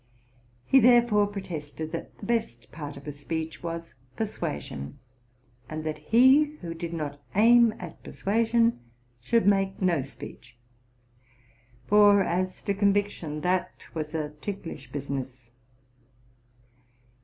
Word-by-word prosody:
He 270 Hz, -, +6 dB
thereupon 235 Hz, -4 st, +5 dB
pro 200 Hz, -1 st, -4 dB
tested 155 Hz, -2 st, -6 dB
that -, -, -6 dB
the -, -, -9 dB
best 120 Hz, -, -2 dB
part 145 Hz, -2 st, -7 dB
of 140 Hz, -, -12 dB
a 150 Hz, -, -4 dB
speech 160 Hz, +3 st, -5 dB
was 165 Hz, 0 st, -5 dB, 0.2 s
persuasion, 75 Hz, -, -4 dB, 0.7 s
and 155 Hz, 0 st, -4 dB
that 155 Hz, -1 st, -3 dB
he 260 Hz, -, +5 dB
who 165 Hz, -1 st, -5 dB
did 165 Hz, 0 st, -5 dB
not 145 Hz, -3 st, -4 dB
aim 230 Hz, +1 st, +6 dB
at 175 Hz, -3 st, -9 dB
persuasion 230 Hz, -, +1 dB, 0.4 s
should 225 Hz, -, +1 dB
make 195 Hz, -1 st, +2 dB
no 175 Hz, -6 st, +2 dB
speech; 130 Hz, -3 st, -10 dB, 1.3 s
for, 205 Hz, +1 st, +6 dB
as 185 Hz, +1 st, -2 dB
to 200 Hz, -, 0 dB
conviction, 200 Hz, -6 st, 0 dB
that 180 Hz, +3 st, -1 dB
was 155 Hz, 0 st, -4 dB
a 155 Hz, -2 st, -2 dB
ticklish 165 Hz, -, -6 dB
business. 130 Hz, -3 st, -5 dB
175 Hz, 120 wpm, -27 LUFS, 150-210 Hz, 1.3 s, He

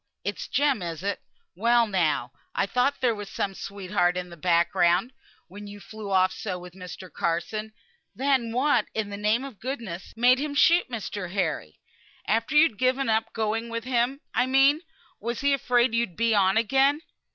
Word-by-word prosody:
It's -, -, -4 dB
Jem, 280 Hz, -6 st, +1 dB
is 170 Hz, -1 st, -5 dB
it? 200 Hz, 0 st, -2 dB, 0.3 s
Well 235 Hz, +4 st, +3 dB
now, 165 Hz, -, 0 dB, 0.2 s
I -, -, +2 dB
thought 250 Hz, +7 st, 0 dB
there 245 Hz, -3 st, +3 dB
was 205 Hz, -2 st, -7 dB
some 195 Hz, -, -2 dB
sweetheart 185 Hz, -2 st, -1 dB
in 180 Hz, -1 st, -5 dB
the -, -, -9 dB
back 170 Hz, +1 st, +2 dB
ground, 175 Hz, +8 st, +2 dB, 0.3 s
when 205 Hz, +3 st, -10 dB
you 205 Hz, 0 st, -10 dB
flew 215 Hz, 0 st, -9 dB
off 185 Hz, -1 st, +3 dB
so 180 Hz, -, -4 dB
with 180 Hz, 0 st, -11 dB
Mr. 185 Hz, 0 st, -10 dB
Carson. 175 Hz, +6 st, -2 dB, 0.4 s
Then 260 Hz, -3 st, +1 dB
what 270 Hz, +5 st, +2 dB
in 215 Hz, -2 st, -2 dB
the -, -, -4 dB
name 210 Hz, +4 st, +1 dB
of 270 Hz, -7 st, -9 dB
goodness 230 Hz, -9 st, -6 dB
made 250 Hz, +2 st, +5 dB
him 290 Hz, 0 st, -3 dB
shoot 340 Hz, +1 st, +4 dB
Mr. 205 Hz, -6 st, -5 dB
Harry? 160 Hz, -, -2 dB, 0.5 s
After 230 Hz, +7 st, 0 dB
you 300 Hz, -, +8 dB
had 225 Hz, -11 st, 0 dB
given 255 Hz, 0 st, +1 dB
up 225 Hz, +1 st, +1 dB
going 225 Hz, +1 st, -2 dB
with 230 Hz, 0 st, -4 dB
him, 255 Hz, +2 st, 0 dB
I 250 Hz, -, +2 dB
mean? 270 Hz, +4 st, +4 dB, 0.4 s
Was 235 Hz, +2 st, -4 dB
he 280 Hz, 0 st, +3 dB
afraid 245 Hz, -3 st, +2 dB
you'd 230 Hz, -7 st, 0 dB
be 230 Hz, 0 st, +2 dB
on 195 Hz, -1 st, +3 dB
again?" 270 Hz, +6 st, +3 dB
220 Hz, 185 wpm, -26 LUFS, 190-255 Hz, 0.5 s, you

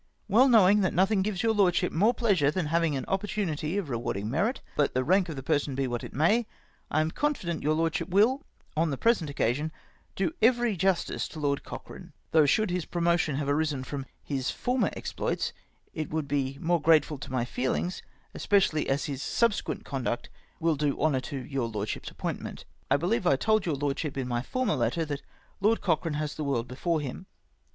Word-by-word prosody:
Well 235 Hz, +6 st, +5 dB
knowing 210 Hz, -3 st, +6 dB
that 185 Hz, -, 0 dB
nothing 190 Hz, +3 st, +3 dB
gives 190 Hz, -2 st, -1 dB
your 225 Hz, -1 st, +3 dB
Lordship 180 Hz, -3 st, +2 dB
more 205 Hz, +8 st, +4 dB
pleasure 200 Hz, -, +2 dB
than 175 Hz, +2 st, -1 dB
having 165 Hz, -1 st, +1 dB
an 135 Hz, -, -3 dB
opportunity 195 Hz, -4 st, -1 dB
of 200 Hz, -6 st, -2 dB
rewarding 115 Hz, -4 st, -3 dB
merit, 200 Hz, -, 0 dB, 0.2 s
let 145 Hz, -3 st, +1 dB
the 130 Hz, -, +2 dB
rank 185 Hz, +4 st, +3 dB
of 160 Hz, -, -4 dB
the 135 Hz, -, -6 dB
person 145 Hz, -2 st, 0 dB
be 135 Hz, 0 st, 0 dB
what 120 Hz, -1 st, -3 dB
it -, -, -7 dB
may, 210 Hz, -, +2 dB, 0.4 s
I 155 Hz, -, +2 dB
am 155 Hz, +1 st, 0 dB
confident 185 Hz, -, -1 dB
your 155 Hz, +2 st, +1 dB
Lordship 165 Hz, +3 st, 0 dB
will, 220 Hz, +9 st, +4 dB, 0.3 s
on 160 Hz, +1 st, +2 dB
the 140 Hz, -, -2 dB
present 220 Hz, -, +2 dB
occasion, 140 Hz, +3 st, 0 dB, 0.4 s
do 180 Hz, -4 st, 0 dB
every 240 Hz, -1 st, +3 dB
justice 185 Hz, 0 st, 0 dB
to 160 Hz, -, -9 dB
Lord 140 Hz, -1 st, 0 dB
Cochrane, -, -, -9 dB, 0.2 s
though 155 Hz, -2 st, +5 dB
should 215 Hz, +6 st, +2 dB
his 180 Hz, -2 st, -1 dB
promotion 170 Hz, -4 st, +1 dB
have 140 Hz, 0 st, -2 dB
arisen 145 Hz, -2 st, 0 dB
from 135 Hz, 0 st, -5 dB, 0.2 s
his 135 Hz, -3 st, -2 dB
former 250 Hz, 0 st, 0 dB
exploits -, -, -2 dB, 0.4 s
it 155 Hz, -1 st, -4 dB
would 155 Hz, -2 st, -2 dB
be 140 Hz, -1 st, -1 dB
more 170 Hz, 0 st, +1 dB
grateful 155 Hz, -2 st, +3 dB
to -, -, -8 dB
my 125 Hz, -2 st, 0 dB
feelings, 130 Hz, +9 st, -2 dB
more -, -, -31 dB, 0.2 s
especially 190 Hz, -7 st, +2 dB
as 135 Hz, +2 st, +1 dB
his 135 Hz, -2 st, -4 dB
subsequent 230 Hz, +4 st, 0 dB
conduct 130 Hz, -4 st, -3 dB, 0.3 s
will 165 Hz, -1 st, +2 dB
do 145 Hz, -1 st, -1 dB
honour 145 Hz, -4 st, +2 dB
to 140 Hz, +2 st, -5 dB
your 130 Hz, -1 st, -2 dB
Lordship's 105 Hz, -2 st, -4 dB
appointment. -, -, -5 dB
" -, -, -37 dB
I 140 Hz, -, +4 dB
believe 185 Hz, +6 st, 0 dB
I 140 Hz, -, +5 dB
told 215 Hz, +7 st, +1 dB
your 155 Hz, -, +1 dB
Lordship, 140 Hz, +1 st, -2 dB
in 130 Hz, -2 st, -2 dB
my 120 Hz, -1 st, -1 dB
former 255 Hz, -, -1 dB
letter, 130 Hz, +6 st, 0 dB
that 145 Hz, -2 st, -4 dB, 0.4 s
Lord 215 Hz, +3 st, +3 dB
Cochrane 165 Hz, -3 st, 0 dB
has 150 Hz, 0 st, -2 dB
the 155 Hz, -, -4 dB
world 125 Hz, -4 st, -1 dB
before 155 Hz, +5 st, -1 dB
him. 145 Hz, +7 st, -6 dB
155 Hz, 200 wpm, -28 LUFS, 140-190 Hz, 0.4 s, knowing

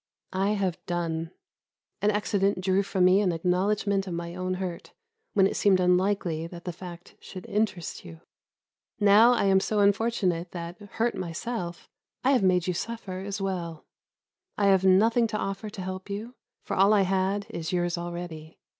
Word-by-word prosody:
I 195 Hz, +2 st, +1 dB
have 190 Hz, -4 st, -2 dB
done; 165 Hz, -2 st, -2 dB, 0.7 s
an 205 Hz, -, +3 dB
accident 200 Hz, -2 st, +1 dB
drew 190 Hz, +1 st, +2 dB
from 190 Hz, -2 st, +1 dB
me 185 Hz, +2 st, +5 dB
an 190 Hz, -3 st, +2 dB
acknowledgment 195 Hz, +3 st, 0 dB
of 175 Hz, -, -3 dB
my 170 Hz, 0 st, -5 dB
own 185 Hz, +1 st, -2 dB
hurt 180 Hz, -2 st, -6 dB, 0.4 s
when 195 Hz, -, +5 dB
it -, -, 0 dB
seemed 195 Hz, -2 st, +4 dB
unlikely 180 Hz, -2 st, +1 dB
that 170 Hz, 0 st, -11 dB
the 180 Hz, -, -3 dB
fact 175 Hz, 0 st, -10 dB
should 185 Hz, -, -10 dB
interest 205 Hz, -5 st, -2 dB
you. 80 Hz, -1 st, -11 dB, 0.8 s
Now 210 Hz, +4 st, +6 dB
I 240 Hz, -, +1 dB
am 195 Hz, -1 st, +4 dB
so 210 Hz, +2 st, -1 dB
unfortunate 200 Hz, -4 st, +1 dB
that, 170 Hz, +1 st, -6 dB
hurt 235 Hz, +2 st, +1 dB
myself, 175 Hz, +1 st, -5 dB, 0.4 s
I 265 Hz, -, +4 dB
have 260 Hz, -, +4 dB
made 180 Hz, -2 st, +3 dB
you 180 Hz, -, 0 dB
suffer 195 Hz, -1 st, -5 dB
as 200 Hz, +1 st, -4 dB
well. 175 Hz, -5 st, -4 dB, 0.7 s
I 200 Hz, -1 st, +3 dB
have 190 Hz, -1 st, +4 dB
nothing 225 Hz, +5 st, +4 dB
to 215 Hz, -, -3 dB
offer 195 Hz, +1 st, -4 dB
to 205 Hz, -2 st, -8 dB
help 185 Hz, +1 st, -6 dB
you, 215 Hz, +5 st, -5 dB, 0.3 s
for -, -, -3 dB
all 195 Hz, +3 st, +5 dB
I 200 Hz, -2 st, +4 dB
had 190 Hz, +2 st, 0 dB
is 165 Hz, +2 st, -4 dB
yours 175 Hz, -1 st, 0 dB
already. 170 Hz, -2 st, -7 dB
190 Hz, 170 wpm, -27 LUFS, 175-205 Hz, 0.8 s, Now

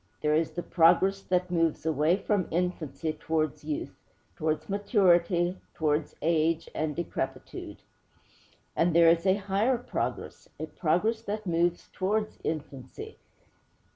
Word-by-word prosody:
There 150 Hz, 0 st, +2 dB
is 160 Hz, +1 st, +2 dB
the 175 Hz, -, -4 dB
progress 185 Hz, +3 st, +4 dB
that 180 Hz, -1 st, 0 dB
moves 165 Hz, -3 st, +1 dB
away 160 Hz, +2 st, +2 dB
from 205 Hz, -3 st, 0 dB
infancy 165 Hz, -2 st, -2 dB
towards 155 Hz, -1 st, -2 dB
youth, 315 Hz, +2 st, -4 dB, 0.4 s
towards 155 Hz, -2 st, -1 dB
maturity, 180 Hz, -3 st, +2 dB, 0.2 s
towards 150 Hz, -1 st, 0 dB
age 165 Hz, 0 st, +1 dB
and 155 Hz, -1 st, -2 dB
decrepitude. 170 Hz, -1 st, -5 dB, 0.9 s
And 170 Hz, 0 st, +2 dB
there 170 Hz, -1 st, +7 dB
is 170 Hz, +3 st, +3 dB
a 190 Hz, -, +5 dB
higher 205 Hz, +5 st, +1 dB
progress, 245 Hz, -, -4 dB
a 155 Hz, -, -2 dB
progress 180 Hz, +8 st, 0 dB
that 210 Hz, +1 st, -4 dB
moves 175 Hz, 0 st, 0 dB
towards 210 Hz, +3 st, -1 dB
infancy. 145 Hz, -5 st, -6 dB
170 Hz, 125 wpm, -28 LUFS, 160-195 Hz, 0.9 s, there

